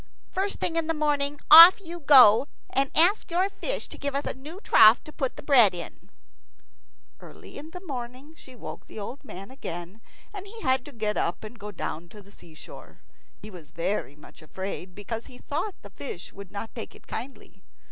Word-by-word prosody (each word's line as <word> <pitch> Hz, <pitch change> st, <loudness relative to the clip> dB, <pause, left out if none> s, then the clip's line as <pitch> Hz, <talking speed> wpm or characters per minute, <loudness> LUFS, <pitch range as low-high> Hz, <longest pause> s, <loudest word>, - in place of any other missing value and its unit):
First 395 Hz, +2 st, -2 dB
thing 330 Hz, -, -1 dB
in 330 Hz, -1 st, -1 dB
the 325 Hz, -, -1 dB
morning 290 Hz, -1 st, 0 dB
off 335 Hz, +6 st, +11 dB
you 345 Hz, -2 st, -9 dB
go, 265 Hz, -5 st, +7 dB, 0.2 s
and 270 Hz, 0 st, +1 dB
ask 360 Hz, +7 st, +3 dB
your 360 Hz, +3 st, +1 dB
fish -, -, -4 dB
to -, -, -11 dB
give 280 Hz, -1 st, -3 dB
us 280 Hz, -, -2 dB
a -, -, -2 dB
new 300 Hz, +8 st, -10 dB
trough 220 Hz, -, +6 dB
to 305 Hz, -, -13 dB
put 265 Hz, -3 st, -3 dB
the -, -, -11 dB
bread 245 Hz, -10 st, +5 dB
in." 170 Hz, -, -10 dB, 1.1 s
Early -, -, -14 dB
in 295 Hz, +3 st, -9 dB
the 360 Hz, +3 st, -11 dB
morning 260 Hz, +1 st, -7 dB
she 260 Hz, -5 st, -15 dB
woke 235 Hz, -, -10 dB
the -, -, -12 dB
old 240 Hz, +7 st, -8 dB
man 195 Hz, -4 st, -10 dB
again, 180 Hz, -4 st, -8 dB, 0.3 s
and 400 Hz, -1 st, -8 dB
he 450 Hz, +3 st, -11 dB
had 260 Hz, -1 st, +1 dB
to 290 Hz, -, -10 dB
get 215 Hz, -4 st, -3 dB
up 170 Hz, -, -2 dB
and 225 Hz, +2 st, -10 dB
go 210 Hz, -1 st, -7 dB
down 170 Hz, -3 st, -6 dB
to 210 Hz, -, -13 dB
the 200 Hz, -, -19 dB
seashore. 160 Hz, -5 st, -14 dB, 0.4 s
He 215 Hz, -, -9 dB
was 170 Hz, -5 st, -13 dB
very 170 Hz, -4 st, -3 dB
much 150 Hz, -, -16 dB
afraid, 185 Hz, +2 st, -7 dB
because 225 Hz, +3 st, -6 dB
he 250 Hz, -, -13 dB
thought 335 Hz, +11 st, -4 dB
the -, -, -12 dB
fish 190 Hz, -10 st, -8 dB
would 200 Hz, -1 st, -11 dB
not 210 Hz, +2 st, -7 dB
take 225 Hz, -, -8 dB
it -, -, -18 dB
kindly. 255 Hz, +4 st, -9 dB
260 Hz, 200 wpm, -26 LUFS, 205-310 Hz, 1.1 s, off